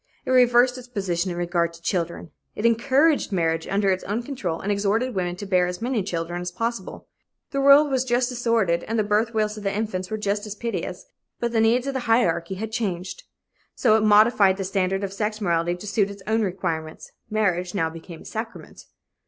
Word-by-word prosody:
It - - -2
reversed 250 0 +4
its 250 - -12
position 190 -6 -2
in 175 - -4
regard 175 -1 0
to 170 - -14
children. 170 -3 -2 0.2
It 210 - -3
encouraged 270 +5 +3
marriage 165 -3 0
under 200 0 +1
its 185 - -1
own 215 +4 -2
control 220 - -4
and 205 - -2
exhorted 210 +5 0
women 180 -2 -2
to 205 - -7
bear 180 -2 +2
as 180 0 -5
many 240 -1 -1
children 175 -2 -3
as 180 - -3
possible. 230 +1 -4 0.4
The 275 - -1
world 280 +1 +6
was 260 -1 +1
just 245 0 +1
as 245 - -6
sordid 215 -8 +2
and 225 - -2
the 215 - +2
birth 215 +3 0
wails 215 0 0
of 210 - -8
the 195 - 0
infants 200 -3 -3
were 215 - -2
just 205 0 -2
as 210 - -6
piteous, 230 +2 -4 0.3
but 235 -1 -1
the 225 -1 +2
needs 235 +3 +3
of 275 - -2
the 265 - -1
hierarchy 190 -6 +2
had 220 +3 -5
changed. 210 - -3 0.5
So 220 -4 +4
it 220 - +3
modified 210 -2 +5
the 195 - -3
standard 195 0 -1
of 195 -1 -3
sex 210 +1 -2
morality 175 -3 0
to 180 - -10
suit 205 -1 +1
its 200 -1 -10
own 220 +1 +1
requirements 165 -5 -3 0.2
marriage 185 -4 0
now 165 -4 0
became 165 0 -10
a - - -21
sacrament. 225 +1 -7
205 Hz, 210 wpm, -24 LUFS, 180-230 Hz, 0.5 s, world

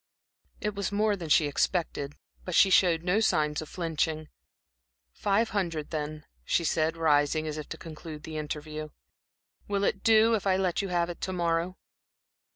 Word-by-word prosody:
It 210 -1 -1
was 200 -1 -2
more 210 +1 +2
than 170 -5 -7
she 150 - +5
expected, 145 -1 -1 0.3
but 180 - -3
she 195 - +6
showed 170 -3 +4
no 180 +4 +2
signs 150 -9 +1
of 155 - -8
flinching. 160 -2 -2 0.8
"Five 210 +3 +1
hundred, 170 -7 -2
then," 155 -1 -4 0.2
she 170 - +1
said, 160 0 +1
rising 155 -1 +2
as 155 0 -4
if 150 - -8
to - - -6
conclude 155 -1 -9
the 155 -1 -5
interview. 155 0 -5 0.8
"Will 200 -1 0
it 195 0 0
do, 225 0 +5
if 205 -3 0
I 190 -1 +3
let 185 -1 0
you 200 - -3
have 175 -1 0
it 170 - -11
to 185 - -2
morrow?" 170 +1 0
165 Hz, 170 wpm, -28 LUFS, 155-195 Hz, 0.8 s, she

